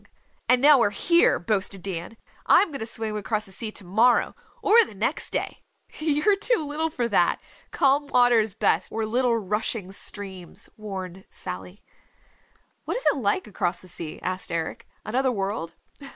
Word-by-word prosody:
"And 250 Hz, +1 st, +4 dB
now 290 Hz, -2 st, +8 dB
we're 230 Hz, -, +3 dB
here," 340 Hz, -, +3 dB
boasted 195 Hz, 0 st, -1 dB
Dan, 185 Hz, +3 st, -5 dB, 0.3 s
"I'm 405 Hz, -, +5 dB
going 280 Hz, -, -6 dB
to 225 Hz, -, -3 dB
swim 220 Hz, -2 st, -1 dB
across 210 Hz, +1 st, -2 dB
the 195 Hz, -, -11 dB
sea 220 Hz, +3 st, -5 dB
to -, -, -4 dB
morrow, 220 Hz, +7 st, +3 dB, 0.3 s
or 460 Hz, +3 st, +6 dB
the 290 Hz, -, -10 dB
next 225 Hz, +10 st, -1 dB
day!" -, -, -4 dB, 0.4 s
"You're 310 Hz, +6 st, +2 dB
too 430 Hz, -6 st, +1 dB
little 310 Hz, +3 st, -2 dB
for 245 Hz, -6 st, -2 dB
that. 185 Hz, -6 st, +2 dB, 0.3 s
Calm 280 Hz, +1 st, +2 dB
water 245 Hz, -3 st, +4 dB
is 215 Hz, -3 st, -1 dB
best, -, -, +1 dB
or 225 Hz, 0 st, -2 dB
little 240 Hz, +1 st, +1 dB
rushing 210 Hz, -1 st, -3 dB
streams," 190 Hz, -3 st, -4 dB
warned 190 Hz, -3 st, -7 dB
Sally. 95 Hz, -, -7 dB, 1.0 s
"What -, -, -2 dB
is -, -, -4 dB
it -, -, -6 dB
like 200 Hz, -5 st, 0 dB
across 185 Hz, -4 st, -2 dB
the 185 Hz, -, -14 dB
sea?" 165 Hz, -3 st, -6 dB
asked 185 Hz, -1 st, -3 dB
Eric. 165 Hz, -1 st, -4 dB, 0.2 s
"Another 260 Hz, +4 st, +1 dB
world?" 195 Hz, -6 st, -3 dB
215 Hz, 165 wpm, -25 LUFS, 190-260 Hz, 1.0 s, now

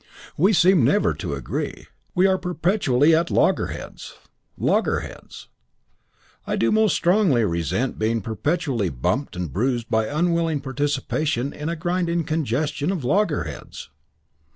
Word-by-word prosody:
"We 190 Hz, +7 st, +3 dB
seem 180 Hz, -, +4 dB
never 150 Hz, -, +3 dB
to -, -, -4 dB
agree. -, -, -5 dB, 0.3 s
We 185 Hz, +1 st, +4 dB
are 190 Hz, -1 st, +3 dB
perpetually 170 Hz, -5 st, +2 dB
at 170 Hz, +2 st, +1 dB
loggerheads. -, -, -1 dB, 0.4 s
Loggerheads. -, -, -2 dB, 1.0 s
I -, -, 0 dB
do 115 Hz, -, +1 dB
most 215 Hz, -2 st, +3 dB
strongly 175 Hz, -, +3 dB
resent 90 Hz, +8 st, -1 dB
being 110 Hz, +1 st, +1 dB
perpetually 115 Hz, -, -1 dB
bumped 105 Hz, -, -2 dB
and 90 Hz, -5 st, -4 dB
bruised 120 Hz, +2 st, -1 dB
by 110 Hz, -1 st, +2 dB
unwilling 165 Hz, 0 st, 0 dB
participation 145 Hz, 0 st, -1 dB
in 150 Hz, +2 st, -5 dB
a 170 Hz, -, -2 dB
grinding 170 Hz, 0 st, -1 dB
congestion 150 Hz, -, -1 dB
of 180 Hz, -8 st, -3 dB
loggerheads." 120 Hz, -, -2 dB
150 Hz, 125 wpm, -23 LUFS, 120-175 Hz, 1.0 s, seem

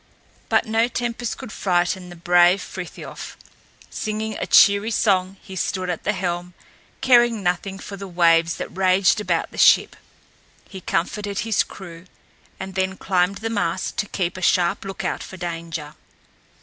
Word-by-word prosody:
But -, -, +3 dB
no 225 Hz, +1 st, +2 dB
tempest 240 Hz, -1 st, -3 dB
could 260 Hz, -5 st, -9 dB
frighten 180 Hz, -1 st, 0 dB
the 175 Hz, -, -10 dB
brave 175 Hz, +2 st, +4 dB
Frithiof. 180 Hz, -2 st, -8 dB, 0.5 s
Singing 215 Hz, 0 st, -3 dB
a -, -, -3 dB
cheery 200 Hz, +2 st, +5 dB
song 195 Hz, -3 st, +1 dB
he 190 Hz, -, -10 dB
stood 185 Hz, 0 st, -2 dB
at 170 Hz, -, -6 dB
the 210 Hz, -, +1 dB
helm, 175 Hz, -2 st, -3 dB, 0.5 s
caring 240 Hz, -5 st, +4 dB
nothing 180 Hz, +2 st, -1 dB
for 200 Hz, 0 st, -8 dB
the 195 Hz, 0 st, -7 dB
waves 170 Hz, -2 st, +3 dB
that -, -, -7 dB
raged 190 Hz, +2 st, +3 dB
about -, -, -1 dB
the -, -, -8 dB
ship. -, -, +5 dB, 0.7 s
He 190 Hz, -, -9 dB
comforted 200 Hz, +4 st, -2 dB
his 225 Hz, -1 st, +1 dB
crew, 170 Hz, -2 st, -9 dB, 0.5 s
and 190 Hz, 0 st, -6 dB
then 190 Hz, 0 st, -1 dB
climbed 185 Hz, 0 st, +1 dB
the -, -, 0 dB
mast 185 Hz, -4 st, -2 dB
to 210 Hz, -, -1 dB
keep 185 Hz, -1 st, -2 dB
a -, -, -7 dB
sharp 175 Hz, +1 st, +2 dB
lookout 195 Hz, 0 st, -4 dB
for 190 Hz, -, -9 dB
danger. 165 Hz, -3 st, -5 dB
190 Hz, 155 wpm, -22 LUFS, 175-205 Hz, 0.7 s, cheery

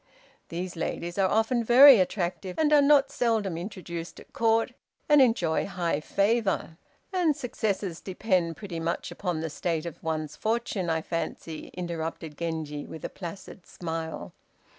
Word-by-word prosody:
These 175 Hz, +2 st, -4 dB
ladies 175 Hz, +2 st, -3 dB
are 190 Hz, -1 st, +3 dB
often 225 Hz, +3 st, +2 dB
very 250 Hz, +1 st, +9 dB
attractive, 180 Hz, 0 st, -2 dB
and 305 Hz, -1 st, +3 dB
are 295 Hz, -, +7 dB
not 280 Hz, -1 st, +5 dB
seldom 220 Hz, -7 st, 0 dB
introduced 170 Hz, -2 st, -6 dB
at -, -, -16 dB
Court 225 Hz, +1 st, +2 dB, 0.4 s
and 295 Hz, -1 st, +6 dB
enjoy 225 Hz, -11 st, +2 dB
high 175 Hz, -6 st, -1 dB
favor." 200 Hz, -1 st, 0 dB, 0.4 s
"And 345 Hz, -5 st, +2 dB
successes 210 Hz, -, -2 dB
depend 185 Hz, -4 st, 0 dB
pretty 190 Hz, -6 st, -6 dB
much 165 Hz, +1 st, -2 dB
upon 175 Hz, -5 st, -3 dB
the 160 Hz, -, -3 dB
state 165 Hz, +1 st, -2 dB
of 170 Hz, -, -7 dB
one's 155 Hz, -2 st, -3 dB
fortune, 215 Hz, -3 st, -1 dB
I 160 Hz, -1 st, 0 dB
fancy," 165 Hz, -1 st, -4 dB
interrupted 165 Hz, -3 st, -4 dB
Genji, 155 Hz, -3 st, -4 dB
with 160 Hz, -, -8 dB
a -, -, -3 dB
placid 180 Hz, 0 st, -9 dB
smile. 165 Hz, -2 st, -5 dB
180 Hz, 145 wpm, -27 LUFS, 165-225 Hz, 0.4 s, very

